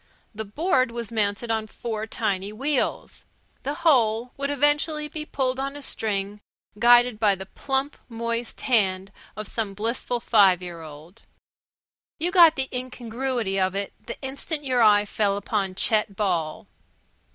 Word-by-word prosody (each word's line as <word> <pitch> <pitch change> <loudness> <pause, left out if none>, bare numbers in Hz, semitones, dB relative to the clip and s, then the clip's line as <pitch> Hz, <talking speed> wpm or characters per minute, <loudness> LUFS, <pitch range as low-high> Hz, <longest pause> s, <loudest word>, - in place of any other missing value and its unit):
The 220 +1 -5
board 260 - +1
was 235 -1 -5
mounted 215 +1 -1
on 220 -1 -1
four 220 0 -5
tiny 200 -3 -2
wheels. 270 +5 -1 0.4
The 285 +2 -3
whole 240 -5 +3
would 280 0 -2
eventually 295 +2 +1
be 305 0 -6
pulled 260 -1 -1
on 275 +1 -3
a 290 - -8
string 205 -3 -2 0.4
guided 240 -1 +5
by 210 -3 +4
the 190 0 -8
plump, 270 +7 -2
moist 235 0 -3
hand 195 -6 +1 0.2
of 215 0 -5
some 210 -3 -3
blissful 235 +3 -2
six 200 -6 +5
year 170 -2 -7
old. 160 +7 -12 1.0
You 340 +3 -1
got 340 -4 +7
the 265 -1 -1
incongruity 250 -4 -2
of 185 0 +1
it 200 0 -3
the 235 - -7
instant 280 +3 -4
your 255 -2 +2
eye 210 -2 +6
fell 200 -1 0
upon 200 -2 -2
Chet 210 0 +1
Ball. 175 -6 -1
225 Hz, 150 wpm, -25 LUFS, 200-265 Hz, 1.0 s, got